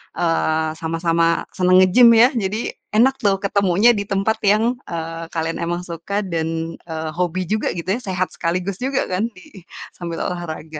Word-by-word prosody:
eee, 160 -1 0
sama-sama 165 0 +1
senang 185 0 +4
nge-gym 235 +6 +6
ya, 235 +3 +7
jadi 215 0 -2 0.2
enak 260 +4 +4
tuh 200 -4 +2
ketemunya 200 +3 +3
di 205 -3 -1
tempat 200 +2 0
yang, 225 +5 +2
eee, 165 0 -5
kalian 165 0 -2
emang 175 +1 -2
suka 180 +5 -4
dan, 165 -2 -3
eee, 160 -1 -5
hobi 180 +1 -1
juga 215 0 0
gitu 175 +1 -5
ya, - - -5
sehat 185 -3 -2
sekaligus 180 +3 -2
juga, 265 +1 0
kan, 185 +5 0
di 185 0 -15 0.3
sambil 170 -2 -5
olahraga. 160 -3 -6
180 Hz, 160 wpm, -20 LUFS, 165-200 Hz, 0.3 s, ya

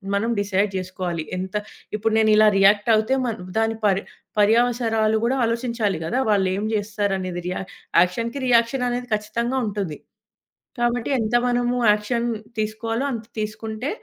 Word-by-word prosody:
మనం 225 +4 0
డిసైడ్ 200 0 0
జేసుకోవాలి. 180 -3 -4
ఎంత 185 0 -5 0.4
ఇప్పుడు 220 +1 0
నేనిలా 215 -1 +5
రియాక్టవుతే, 215 +4 +4
మన్ 230 -3 -3 0.2
దాని 225 0 +1
పర్ 195 -1 +3 0.4
పర్యవసరాలు 225 0 +3
గూడా 260 +3 +1
ఆలోచించాలి 230 -6 -1
గదా! 245 +11 0
వాళ్ళేం 195 0 +1
జేస్తారనేది 200 -4 -2
రియా 180 - -2 0.4
యాక్షన్‌కి 230 +9 -1
రియాక్షననేది 245 +1 +1
ఖచ్చితంగా 235 +5 -2
ఉంటుంది. 195 -7 -4 0.8
కాబట్టి, 240 +1 0
ఎంత 225 +2 0
మనము 245 0 +1 0.2
యాక్షన్ 235 +3 -1 0.3
తీసుకోవాలో 225 +3 -2
అంత 225 -2 -5
తీసుకుంటే 220 +4 -4
215 Hz, 120 wpm, -23 LUFS, 200-235 Hz, 0.8 s, నేనిలా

